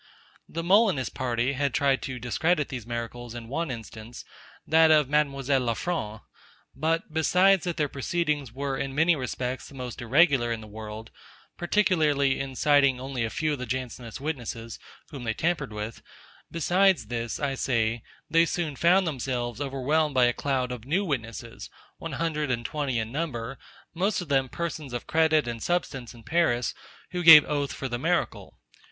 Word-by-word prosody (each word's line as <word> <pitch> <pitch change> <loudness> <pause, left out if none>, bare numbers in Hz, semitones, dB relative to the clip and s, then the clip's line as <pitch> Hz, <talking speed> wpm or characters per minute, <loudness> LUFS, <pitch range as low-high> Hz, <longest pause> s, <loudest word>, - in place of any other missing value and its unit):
The 165 +1 -4
Molinist 185 - +3
party 125 +1 -1
had 140 -1 -1
tried 140 -2 +2
to 130 -1 -5
discredit 150 +7 0
these 125 -5 -6
miracles 120 0 -5
in 115 -1 -7
one 155 +6 -2
instance, 115 -1 -8 0.4
that 160 0 +5
of 150 -3 +5
Mademoiselle 140 -2 +1
le 115 -2 0
Franc. 110 -12 -3 0.5
But, 160 +2 -1
besides 180 +4 +4
that 175 -2 -2
their 150 - +1
proceedings 145 -1 -2
were 135 +2 -3
in 135 -1 -3
many 160 +3 +4
respects 130 -1 -4
the 140 - -14
most 125 -2 -6
irregular 135 -1 +3
in 115 - -2
the 110 - -10
world, 110 +1 -8 0.4
particularly 155 -8 +2
in 135 -1 -5
citing 140 -2 +4
only 130 -2 -3
a 115 - -1
few 155 +5 -1
of 145 - -4
the 125 - -5
Jansenist 125 -2 -5
witnesses, 120 -6 -5 0.3
whom 140 -4 -7
they 110 -2 -2
tampered 155 -7 -1
with: 105 +1 -6 0.5
Besides 180 - +2
this, 115 0 -4
I 140 -2 -1
say, 115 -3 0 0.3
they 165 0 +4
soon 165 -5 -2
found 180 +6 +4
themselves 125 -4 -3
overwhelmed 145 +2 0
by 125 -1 +5
a 120 - +2
cloud 130 -2 -1
of 125 -3 -6
new 175 +10 0
witnesses, 115 - -5 0.3
one - - -6
hundred 155 -3 -1
and 120 -2 -1
twenty 140 -5 -2
in 110 0 -2
number, 135 -4 -4 0.3
most 190 +4 0
of 175 -5 -7
them 135 -2 +2
persons 160 -5 -5
of 120 - -4
credit 160 -3 +2
and 115 -1 -4
substance 135 -8 -2
in 115 - -15
Paris, 125 -7 +1 0.4
who 180 -1 -2
gave 160 -3 +10
oath 145 -2 -1
for 135 - -4
the 120 -1 -3
miracle. 170 +5 -1
135 Hz, 170 wpm, -27 LUFS, 120-160 Hz, 0.5 s, gave